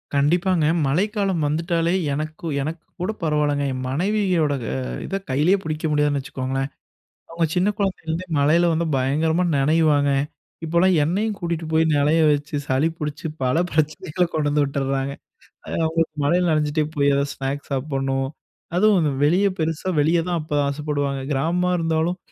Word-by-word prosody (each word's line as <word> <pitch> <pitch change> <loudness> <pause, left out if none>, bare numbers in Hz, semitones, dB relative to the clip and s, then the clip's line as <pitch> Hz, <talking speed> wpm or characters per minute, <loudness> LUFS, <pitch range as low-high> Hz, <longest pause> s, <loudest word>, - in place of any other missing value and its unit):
கண்டிப்பாங்க. 170 +4 +2 0.2
மழைக்காலம் 195 +2 0
வந்துட்டாலே, 165 +2 0 0.2
எனக்கு, 155 +3 -5 0.2
எனக்கு 155 +4 -5 0.2
கூட 185 +4 0
பரவாயில்லங்க. 150 -2 +1
என் 130 0 -4
மனைவியோட 180 -1 +1 0.5
இத, 195 - -4
கையிலயே 150 +9 +3
பிடிக்க 155 0 -3
முடியாதுன்னு 150 -1 +2
வச்சுக்கோங்களேன். 135 +1 -3 0.6
அவங்க 165 0 0
சின்ன 180 +3 +3
குழந்தைலருந்தே 185 -3 -2
மழையில 160 +5 +4
வந்து 165 +1 0
பயங்கரமா 155 +6 +1
நனைவாங்க. 145 0 +3 0.5
இப்போலாம் 170 +3 +3
என்னையும் 200 +7 0
கூட்டிகிட்டு 170 -2 -3
போய் 160 0 +4
நனைய 150 +3 +3
வச்சு, 145 +1 -3
சளி 135 +5 +2
பிடிச்சு, 150 0 -4 0.2
பல 130 +3 +1
பிரச்சனைகள 155 +2 0
கொண்டு 155 -2 0
வந்து 145 0 +2
விட்டுடுறாங்க. 135 0 -2 0.5
அது - - -5
அவங்களுக்கு 160 -1 -1
மழையில 175 +5 +2
நனைஞ்சிட்டே 155 0 +1
போய், 140 -1 +3
எதாவது 140 0 0
ஸ்நாக்ஸ் 135 +1 -4
சாப்பிடணும். 135 -1 -1 0.5
அதுவும், 210 +2 +4
இந்த 150 -2 +1
வெளிய 180 +7 +3
பெருசா 160 +3 -2
வெளியே 165 +3 +3
தான் 175 -2 0
அப்ப 150 0 -7
ஆசைப்படுவாங்க. 140 -1 -2
கிராமமா 170 +6 +1
இருந்தாலும், 165 +1 0
155 Hz, 140 wpm, -22 LUFS, 145-170 Hz, 0.6 s, மழையில